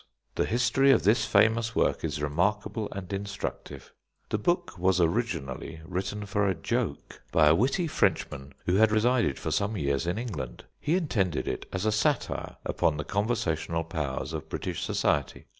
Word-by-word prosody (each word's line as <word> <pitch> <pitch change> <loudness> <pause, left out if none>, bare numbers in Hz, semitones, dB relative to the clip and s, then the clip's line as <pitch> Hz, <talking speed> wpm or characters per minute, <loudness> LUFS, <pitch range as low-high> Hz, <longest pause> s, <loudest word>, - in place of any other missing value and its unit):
The - - +1
history 125 +4 +3
of 135 - +5
this 110 +2 +4
famous 110 +1 +3
work - - +1
is 75 -2 -2
remarkable 105 +8 0
and 100 0 -6
instructive. 100 +1 -5 0.4
The 110 - 0
book 175 - 0
was 95 0 +3
originally 80 - -1
written 95 +4 -3
for 100 0 +1
a 95 - +1
joke, 80 - -3
by 80 - +5
a 75 - +7
witty 135 - +2
Frenchman 70 - -1
who 90 +2 +2
had 110 0 +5
resided 115 - +2
for - - -4
some 100 +1 0
years 70 -1 0
in 90 +3 0
England. 105 - -5 0.2
He 155 +4 +1
intended 105 - 0
it - - -3
as 95 +2 -2
a 110 - +3
satire 120 +6 0
upon 75 - +1
the 75 - -2
conversational 90 -6 -1
powers 80 -5 -3
of - - -5
British - - -3
society. 70 -2 0
100 Hz, 165 wpm, -28 LUFS, 80-115 Hz, 0.4 s, a